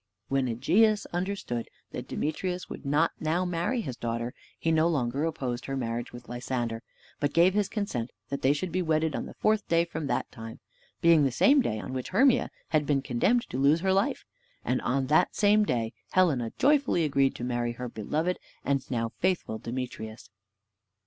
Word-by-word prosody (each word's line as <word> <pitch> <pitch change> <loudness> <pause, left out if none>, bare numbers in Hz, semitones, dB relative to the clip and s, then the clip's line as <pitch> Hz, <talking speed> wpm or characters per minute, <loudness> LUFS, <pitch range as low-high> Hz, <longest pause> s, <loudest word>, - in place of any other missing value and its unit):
When 135 -1 +1
Egeus 205 - +3
understood 175 - -3 0.2
that - - -6
Demetrius 180 +4 -2
would - - -7
not 150 +4 +3
now 165 +4 0
marry 180 +8 -1
his 130 - -5
daughter, 120 +1 -3 0.2
he 165 - 0
no 160 +1 +4
longer 140 -2 0
opposed 130 -6 -3
her 135 0 -2
marriage 120 -1 -3
with 120 0 -11
Lysander, 120 -2 -3 0.4
but 145 -1 -1
gave 175 +3 +5
his 205 -1 +1
consent 130 - -2 0.2
that 140 - -3
they 135 - +4
should 170 +5 -2
be 185 - 0
wedded 160 -2 +1
on - - -3
the - - -11
fourth 215 0 +1
day 170 0 +3
from 160 -3 -5
that 125 - -1
time, 115 0 -9 0.4
being 165 -3 +6
the 135 - +2
same 275 - +5
day 110 - -1
on 130 - -6
which 130 -1 -4
Hermia 260 -1 +4 0.2
had 150 -3 +1
been 140 -2 +2
condemned 195 - +1
to 130 - -2
lose 145 +4 +4
her 190 0 +2
life; 195 +3 0 0.4
and 125 - 0
on 130 +2 0
that 155 +6 +3
same 210 0 +4
day 115 - -1 0.2
Helena 140 -11 +3
joyfully 275 - +3
agreed 140 -2 +2
to - - -6
marry 120 -1 -1
her 125 +1 -5
beloved 155 - -2 0.3
and 140 -1 0
now 115 -2 -1
faithful 180 -12 0
Demetrius. 115 -3 -6
145 Hz, 185 wpm, -28 LUFS, 120-180 Hz, 0.4 s, being